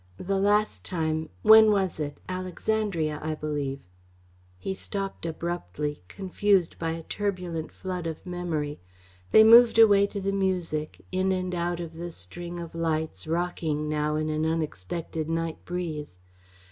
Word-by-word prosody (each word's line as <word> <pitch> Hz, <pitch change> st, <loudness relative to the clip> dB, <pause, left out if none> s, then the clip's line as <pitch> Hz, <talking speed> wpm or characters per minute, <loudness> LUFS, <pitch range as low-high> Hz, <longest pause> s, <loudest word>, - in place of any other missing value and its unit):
The 195 Hz, -, -1 dB
last 205 Hz, +2 st, +2 dB
time 160 Hz, -3 st, -2 dB
when 220 Hz, 0 st, +9 dB
was 195 Hz, -5 st, +1 dB
it? 145 Hz, -1 st, -3 dB
Alexandria, 185 Hz, -3 st, -1 dB
I 155 Hz, 0 st, -2 dB
believe 145 Hz, -4 st, -3 dB, 0.4 s
" -, -, -31 dB, 0.3 s
He 140 Hz, -, -3 dB
stopped 195 Hz, -2 st, -4 dB
abruptly, 150 Hz, -, -4 dB
confused 190 Hz, -, +1 dB
by 165 Hz, -1 st, -1 dB
a 165 Hz, 0 st, -6 dB
turbulent 180 Hz, -5 st, -3 dB
flood 180 Hz, -2 st, -4 dB
of 160 Hz, +2 st, -6 dB
memory. 170 Hz, -5 st, -3 dB, 0.5 s
They 220 Hz, -, +8 dB
moved 230 Hz, +1 st, +8 dB
away 200 Hz, -3 st, +7 dB
to 200 Hz, -, -5 dB
the 195 Hz, 0 st, -1 dB
music, 180 Hz, -6 st, -2 dB
in 185 Hz, +1 st, +1 dB
and 185 Hz, -1 st, -1 dB
out 175 Hz, 0 st, -1 dB
of 165 Hz, -1 st, -6 dB
the 170 Hz, +2 st, -6 dB
string 175 Hz, -, -6 dB
of 170 Hz, -1 st, -7 dB
lights, 160 Hz, -, -2 dB
rocking 160 Hz, -3 st, -1 dB
now 150 Hz, 0 st, 0 dB
in 155 Hz, 0 st, -1 dB
an 155 Hz, 0 st, 0 dB
unexpected 160 Hz, -, -2 dB
night 165 Hz, 0 st, -2 dB
breeze. 160 Hz, -, -4 dB
170 Hz, 145 wpm, -27 LUFS, 155-190 Hz, 0.5 s, when